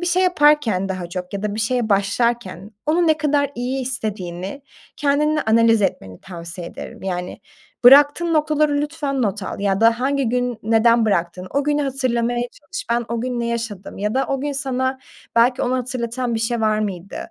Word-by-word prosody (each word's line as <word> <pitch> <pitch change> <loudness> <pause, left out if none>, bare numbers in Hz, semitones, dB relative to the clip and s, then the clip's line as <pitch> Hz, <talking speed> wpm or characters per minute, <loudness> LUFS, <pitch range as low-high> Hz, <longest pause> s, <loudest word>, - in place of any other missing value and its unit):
Bir 350 - -2
şey 365 +1 +2
yaparken 295 - +3
daha 185 -2 -4
çok 180 +1 -6
ya 200 - -4
da 210 -1 -2
bir 220 - -3
şeye 235 0 0
başlarken 200 -1 0 0.2
onu 335 +2 +2
ne 310 - +4
kadar 290 -2 +1
iyi 255 +2 -2
istediğini 200 -2 -4 0.3
kendinle 300 +1 +1
analiz 225 -1 +4
etmeni 95 - -3
tavsiye 170 -1 -8
ederim. - - -10
Yani, 180 -1 -4 0.4
bıraktığın 290 +6 +7
noktaları 300 -1 +2
lütfen 295 -3 -2
not 205 -1 -1
al 195 - -5
ya 195 0 0
da 230 +1 +4
hangi 275 -1 +1
gün 245 -1 -1
neden 225 +1 +4
bıraktın, 180 -1 -1
o 280 0 0
günü 295 0 +1
hatırlamaya 245 -3 0
çalış, 365 +8 -8
ben 235 0 +1
o 230 - -2
gün 245 -1 -2
ne 235 - -1
yaşadım 225 -6 -5
ya 210 +3 -1
da 265 - +1
o 270 -1 -2
gün 290 0 -2
sana 260 -1 -1 0.4
belki 245 +2 +4
onu 250 +1 0
hatırlatan 245 -1 -3
bir 225 - -1
şey 230 0 -1
var 215 -1 +2
mıydı 195 -3 -4
240 Hz, 185 wpm, -21 LUFS, 205-275 Hz, 0.4 s, bıraktığın